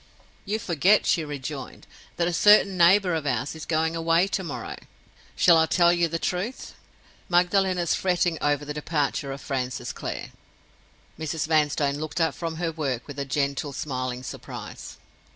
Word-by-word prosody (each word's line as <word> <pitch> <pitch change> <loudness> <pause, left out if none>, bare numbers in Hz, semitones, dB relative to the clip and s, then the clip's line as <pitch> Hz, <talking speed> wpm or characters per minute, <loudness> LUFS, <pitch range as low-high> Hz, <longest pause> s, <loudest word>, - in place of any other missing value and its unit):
"You 210 +2 -1
forget," 190 +1 +3
she 165 - +2
rejoined, 145 -2 -7 0.3
"that 170 0 0
a 175 - -1
certain 205 +2 +5
neighbor 180 +1 +5
of 155 -3 -2
ours 125 +1 -1
is 160 -1 -9
going 160 0 0
away 165 +2 +2
to 195 - -2
morrow. 165 - -6 0.6
Shall 170 -2 +6
I 160 0 +4
tell 175 0 +4
you 175 -1 +2
the 165 +1 -2
truth? 185 +9 -3 0.6
Magdalen 185 +1 +3
is 170 -2 +1
fretting 175 -3 0
over 145 0 +1
the 150 - -4
departure 145 -2 -2
of 135 0 -7
Francis 125 -2 -3
Clare." - - -6 0.9
Mrs. 160 0 -2
Vanstone 150 -2 +1
looked 155 +2 -4
up 165 -1 +2
from 165 -1 -4
her 165 0 -2
work 135 -7 -3
with 145 0 -8
a 140 - -2
gentle, 140 +1 -1
smiling 130 -3 -4
surprise. - - -8
160 Hz, 165 wpm, -25 LUFS, 145-175 Hz, 0.9 s, Shall